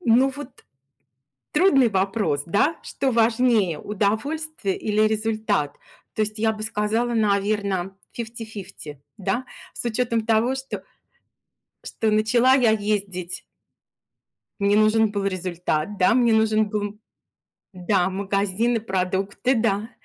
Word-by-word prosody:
ну, 260 -2 +4
вот 285 -2 -10 0.9
трудный 275 -10 +4
вопрос, 195 -6 0
да? 205 - +2
Что 270 - -2
важнее: 225 -6 +2
удовольствие 220 - -2
или 215 0 +1
результат? 215 -8 -1 0.4
То 215 - +1
есть 215 +1 -3
я 220 0 +2
бы 215 0 -7
сказала, 220 +2 0
наверно, 200 -3 0 0.2
фифти-фифти, 215 - -7 0.2
да? 200 +6 -1 0.3
С - - -6
учетом 230 -1 0
того, 230 +3 +2
что, 265 0 -6 1.0
что 220 -1 -1
начала 235 +4 +4
я 245 -5 +4
ездить 200 -4 -2 1.2
мне 200 0 +3
нужен 215 0 +4
был 200 -1 -2
результат, 180 -1 -2
да? 185 - +4
Мне 240 -2 +3
нужен 220 -1 +2
был, 210 0 -2
м, 205 +1 -6 0.7
да, 180 0 +1
магазин 200 +4 0
и - - +2
продукты, 195 +4 -1
да. 220 -1 0
215 Hz, 120 wpm, -23 LUFS, 195-230 Hz, 1.2 s, ну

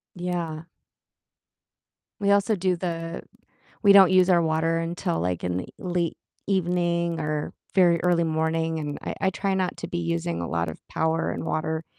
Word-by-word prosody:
Yeah. 175 -3 -3 1.6
We 200 0 +2
also 205 +1 +3
do 185 0 +1
the 165 -1 -4 0.6
we 200 -1 +7
don't 190 -2 +8
use 185 0 +5
our 175 -1 +5
water 165 +1 +1
until 165 - -2
like 90 0 -2
in 90 0 -1
the 90 - -5
late 175 -2 -2 0.3
evening 175 -3 0
or 150 -1 -2 0.2
very 175 -3 +4
early 175 -1 +3
morning, 160 0 0
and 145 -1 -4
I - - -4
I 190 - +2
try 195 0 -1
not 185 -1 -1
to - - -5
be - - -3
using 85 0 -2
a 85 - -3
lot 85 0 -1
of 80 - -7
power 160 0 0
and - - -4
water 160 0 -2
165 Hz, 170 wpm, -25 LUFS, 155-180 Hz, 1.6 s, don't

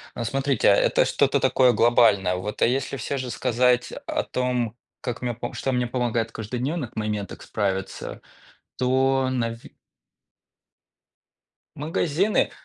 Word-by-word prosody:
Ну 120 - -3
смотрите, 135 +1 +1
а, - - +6
это - - +3
что-то - - +2
такое 125 -2 +4
глобальное. 105 -6 +4
Вот, 105 +4 -5
а - - +6
если 135 +2 -1
всё 135 +3 -3
же 130 -1 -4
сказать 125 0 +2 0.2
о - - -1
том, 125 -3 -1 0.3
как 120 -1 -4
мне 120 -1 -1
пом 120 +1 -6
что 135 - -2
мне 125 -1 0
помогает 120 -2 -1
в - - -22
каждодневных 125 +5 -4
моментах 105 -2 -3
справиться, 95 -2 -3 0.6
то 130 +1 +2
нави 115 -2 -3 2.0
Магазины, 165 +6 +1
125 Hz, 135 wpm, -24 LUFS, 115-130 Hz, 2.0 s, а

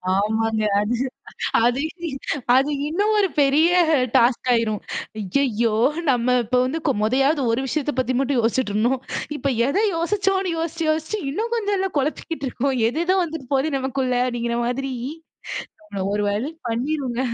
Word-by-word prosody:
ஆமாங்க. 220 +2 +1 0.2
அது 210 +4 0 0.7
அது 245 +2 +2 0.8
அது 275 +3 +3 0.2
இன்னும் 410 +7 +1
ஒரு 395 -2 +3
பெரிய 290 +4 +4 0.5
டாஸ்க் 245 +1 +3
ஆயிரும். 225 -3 +1 0.4
ஐயயோ! 230 +1 +1 0.4
நம்ம 250 0 +2
இப்ப 250 +3 +2
வந்து 265 +6 -1 0.2
மொதயாவது 270 +6 +2
ஒரு 240 - +1
விஷயத்த 295 0 -1
பத்தி 255 0 +1
மட்டும் 275 -1 +1
யோசிச்சிட்டுருந்தோம். 235 +1 +1 0.4
இப்ப 275 -2 -1 0.2
எத 285 - +1 0.2
யோசிச்சோம்னு 385 +1 0
யோசிச்சு, 330 0 -2
யோசிச்சு 315 +7 -1
இன்னும் 450 +9 -3
கொஞ்சம்ல 405 -3 0
கொழப்பிக்கிட்டு 295 +1 -2
இருக்கோம். 270 +2 -1
எது 300 +7 -2
எதோ 375 +1 +3
வந்துட்டு 315 -6 -7
போகுது 275 +2 +1
நமக்குள்ள, 265 -1 -1
அப்படிங்கிற 235 -1 -2
மாரி 260 +2 -2 0.9
நம்மள 200 -11 -5
ஒரு 205 - 0
வழி 225 +9 -2 0.2
பண்ணிருங்க. 250 +1 -2
265 Hz, 135 wpm, -22 LUFS, 235-315 Hz, 0.9 s, பெரிய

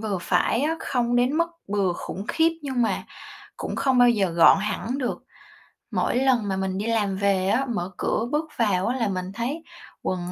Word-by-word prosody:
vừa 210 -4 -2
phải 185 +8 +1
á, 320 +2 0
không 245 -1 0
đến 245 +2 +3
mức 335 - +3 0.2
bừa 200 -3 +1
khủng 195 +3 -6
khiếp 330 0 +3
nhưng 265 -4 -1
mà 225 - 0 0.5
cũng - - -5
không 265 -2 +2
bao 245 0 +7
giờ 200 -5 +1
gọn 170 +3 +6
hẳn 215 +5 -2
được. 250 -3 -3 0.7
Mỗi - - 0
lần 250 -4 +2
mà 190 -1 -1
mình 190 0 -2
đi 205 +3 -2
làm 205 -4 0
về 195 -2 +1
á, 240 +7 +2
mở 190 -5 -2
cửa 225 - 0
bước 310 +1 -1
vào 195 -5 +1
á 250 +3 0
là 230 - 0
mình 185 -1 -3
thấy 270 +9 -3 0.4
quần 180 -1 -2
220 Hz, 205 wpm, -24 LUFS, 190-250 Hz, 0.7 s, bao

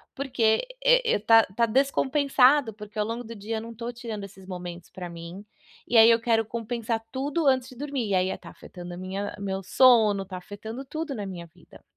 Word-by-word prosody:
porque 245 - +1 0.2
e - - +4
tá 225 +2 +6
tá 235 +3 +2
descompensado, 270 +1 +3
porque 210 +1 -11
ao 210 - +1
longo 230 +2 -4
do 230 +1 -8
dia 220 +2 -4
eu - - -4
não 230 +1 -8
estou 235 +1 -5
tirando 230 -4 -7
esses 190 -1 -12
momentos 180 -2 -7
pra 180 -1 -8
mim. 170 +4 -9 0.4
E 240 - +2
aí 225 +1 +9
eu 230 0 +4
quero 225 -1 +2
compensar 230 0 -3
tudo 285 +5 -2
antes 260 -2 +3
de 255 - -13
dormir. 275 -3 -3
E - - +3
aí 185 +1 0
tá - - -12
afetando 175 -1 -10
a - - -8
minha 190 +2 -5
meu 195 -1 -3
sono, 220 -2 +4
tá 185 -1 -8
afetando 220 +7 -8
tudo 310 +1 -4
na 210 -5 -5
minha 180 -3 -7
vida. 170 +1 -19
225 Hz, 205 wpm, -26 LUFS, 195-255 Hz, 0.4 s, aí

